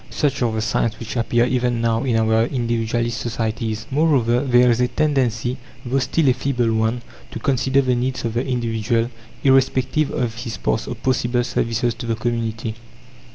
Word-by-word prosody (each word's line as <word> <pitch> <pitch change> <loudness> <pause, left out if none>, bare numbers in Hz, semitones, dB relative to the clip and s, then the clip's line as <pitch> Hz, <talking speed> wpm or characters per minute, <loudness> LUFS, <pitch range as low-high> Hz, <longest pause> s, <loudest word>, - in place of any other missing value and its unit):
Such 140 -3 -1
are 120 -2 +2
the 110 0 -2
signs 110 0 0
which 115 0 -6
appear 120 0 +2
even 125 -1 0
now 115 0 +1
in 125 -4 +1
our 110 0 +3
individualist 120 -1 -1
societies. 110 -1 -3
Moreover, 135 -5 +3
there 125 -2 +4
is 120 +1 +1
a 125 - +3
tendency, 130 -5 0 0.3
though 130 +3 +1
still 140 +4 +1
a - - +5
feeble 125 -3 0
one, 110 +2 0 0.3
to - - -7
consider 135 0 +2
the 130 -1 +2
needs 125 +1 -2
of 115 - -2
the 120 +2 0
individual, 115 -1 0 0.3
irrespective 135 +2 +3
of 115 -2 -2
his 115 -1 -5
past 110 - -1
or 125 - -4
possible 120 0 0
services 120 0 0
to 115 +1 -7
the 115 - 0
community. 115 -1 -2
120 Hz, 175 wpm, -21 LUFS, 115-130 Hz, 0.3 s, a